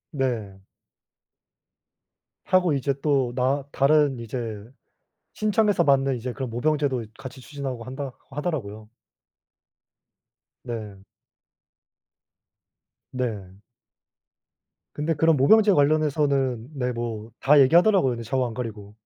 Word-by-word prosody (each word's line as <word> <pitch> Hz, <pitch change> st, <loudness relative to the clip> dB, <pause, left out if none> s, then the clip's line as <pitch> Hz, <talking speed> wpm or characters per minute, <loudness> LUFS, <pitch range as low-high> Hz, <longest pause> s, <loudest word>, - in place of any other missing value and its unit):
네. 110 Hz, -8 st, -3 dB, 1.8 s
하고 180 Hz, -3 st, +3 dB
이제 140 Hz, 0 st, 0 dB
또 135 Hz, -5 st, +1 dB
나 135 Hz, +2 st, 0 dB
다른 140 Hz, -2 st, +3 dB
이제 115 Hz, -3 st, -5 dB, 0.7 s
신청해서 210 Hz, -3 st, +2 dB
받는 135 Hz, -2 st, +2 dB
이제 125 Hz, +1 st, -5 dB
그런 130 Hz, -1 st, -5 dB
모병제도 135 Hz, -1 st, 0 dB
같이 130 Hz, 0 st, -9 dB
추진하고 135 Hz, -3 st, -6 dB
한다 130 Hz, +1 st, -6 dB, 0.2 s
하더라고요. 130 Hz, -9 st, -4 dB, 1.8 s
네. 105 Hz, -5 st, -7 dB, 2.1 s
네. 105 Hz, -7 st, -4 dB, 1.4 s
근데 155 Hz, +2 st, -1 dB
그런 160 Hz, +2 st, +3 dB
모병제 205 Hz, +10 st, +5 dB
관련해서는 140 Hz, -5 st, +1 dB
네 125 Hz, -1 st, -1 dB
뭐 115 Hz, -2 st, -5 dB
다 145 Hz, +2 st, +5 dB
얘기하더라고요 170 Hz, +2 st, +5 dB
근데 115 Hz, -1 st, -5 dB
좌우 130 Hz, +3 st, -1 dB
안 115 Hz, -, -5 dB
가리고. 105 Hz, -3 st, -7 dB
130 Hz, 220 characters per minute, -24 LUFS, 115-150 Hz, 2.1 s, 모병제